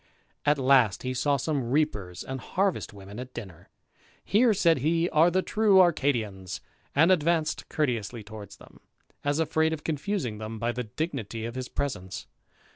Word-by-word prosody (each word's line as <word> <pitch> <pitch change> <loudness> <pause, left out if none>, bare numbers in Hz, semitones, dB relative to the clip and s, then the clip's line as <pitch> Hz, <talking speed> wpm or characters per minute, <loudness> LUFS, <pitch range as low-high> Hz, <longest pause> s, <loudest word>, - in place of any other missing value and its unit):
At 145 0 +5
last 130 -6 +4
he 130 0 -2
saw 140 +2 +1
some 135 -3 -1
reapers 105 - -1
and 130 0 -5
harvest 190 - -1
women 100 +2 -10
at 130 0 -8
dinner. 90 -7 -9 0.6
Here, 225 +4 +4
said 170 -7 +3
he, 165 +5 +2
are 160 +3 +5
the 185 +2 +1
true 210 -3 +4
Arcadians, 115 - +1 0.4
and 160 +6 +5
advanced 165 -2 +1
courteously 120 -6 -1
towards 105 -1 -10
them, - - -17 0.4
as 145 0 +1
afraid 160 0 +2
of 150 - -5
confusing 150 - -2
them 110 +1 -5
by 115 +2 -1
the 125 0 -4
dignity 115 -4 -4
of 115 - -5
his 130 0 -5
presence. 95 -10 -4
135 Hz, 160 wpm, -27 LUFS, 110-160 Hz, 0.6 s, At